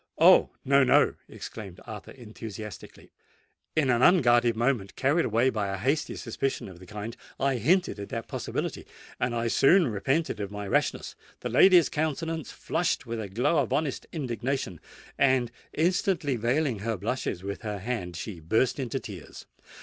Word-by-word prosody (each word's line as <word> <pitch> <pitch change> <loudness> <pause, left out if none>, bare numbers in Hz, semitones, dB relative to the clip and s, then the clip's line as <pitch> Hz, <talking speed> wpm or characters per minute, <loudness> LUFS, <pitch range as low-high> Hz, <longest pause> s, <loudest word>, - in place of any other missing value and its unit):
"Oh! - - +7 0.2
no—no," 140 -1 +5 0.2
exclaimed 100 -5 -9
Arthur, 105 -2 -8
enthusiastically: 110 -5 -9 0.6
"in 145 -5 +3
an 120 0 +2
unguarded 120 -9 +5
moment—carried 130 - +1
away 120 +4 +2
by 105 -4 -1
a 95 0 -3
hasty 140 +10 0
suspicion 135 +2 -3
of 90 -3 -12
the 90 - -13
kind—I 115 +6 -4
hinted 175 - +2
at 100 - -6
that - - -5
possibility,—and 120 - -4
I 115 0 0
soon 170 +10 +5
repented 135 +7 -1
of 100 -1 -3
my 105 0 -6
rashness! - - 0 0.3
The - - -3
lady's 180 -4 +6
countenance 160 0 -2
flushed - - -1
with 115 -1 -4
a 100 - -6
glow 125 - +2
of 130 - -1
honest 150 -3 -1
indignation; 125 - -3 0.4
and, 130 -3 +3 0.2
instantly 170 -3 +1
veiling 120 +1 0
her 110 +1 -2
blushes 100 -2 -3
with 100 0 -5
her 105 -3 -4
hand, 100 -4 -4
she 85 +2 -6
burst 110 - +1
into 135 0 -2
tears. 95 - -10
120 Hz, 150 wpm, -27 LUFS, 105-140 Hz, 0.6 s, Oh